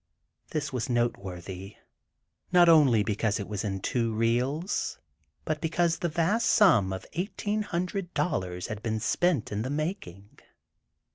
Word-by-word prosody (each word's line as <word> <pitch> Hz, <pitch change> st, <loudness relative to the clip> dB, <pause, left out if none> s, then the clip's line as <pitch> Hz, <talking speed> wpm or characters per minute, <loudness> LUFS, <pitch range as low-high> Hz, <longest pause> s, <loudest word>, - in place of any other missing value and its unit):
This 150 Hz, -3 st, -3 dB
was 125 Hz, -1 st, -2 dB
noteworthy, 95 Hz, -5 st, -3 dB, 0.8 s
not 175 Hz, -1 st, +6 dB
only 140 Hz, -10 st, +6 dB
because 105 Hz, 0 st, 0 dB
it 100 Hz, -, -5 dB
was 105 Hz, -2 st, -4 dB
in 95 Hz, -2 st, -2 dB
two 115 Hz, +1 st, 0 dB
reels, 125 Hz, -, 0 dB, 0.5 s
but 155 Hz, 0 st, -2 dB
because 170 Hz, +1 st, +1 dB
the 175 Hz, -, -1 dB
vast 175 Hz, +8 st, +1 dB
sum 125 Hz, -, +5 dB
of 95 Hz, -1 st, -5 dB
eighteen 205 Hz, +4 st, -2 dB
hundred 180 Hz, -1 st, -3 dB
dollars 90 Hz, -, -1 dB
had 110 Hz, -1 st, -5 dB
been 110 Hz, -1 st, -2 dB
spent 140 Hz, +3 st, +1 dB
in 105 Hz, +1 st, -2 dB
the 125 Hz, -, -3 dB
making." 145 Hz, -, -5 dB
120 Hz, 140 wpm, -28 LUFS, 105-170 Hz, 0.8 s, not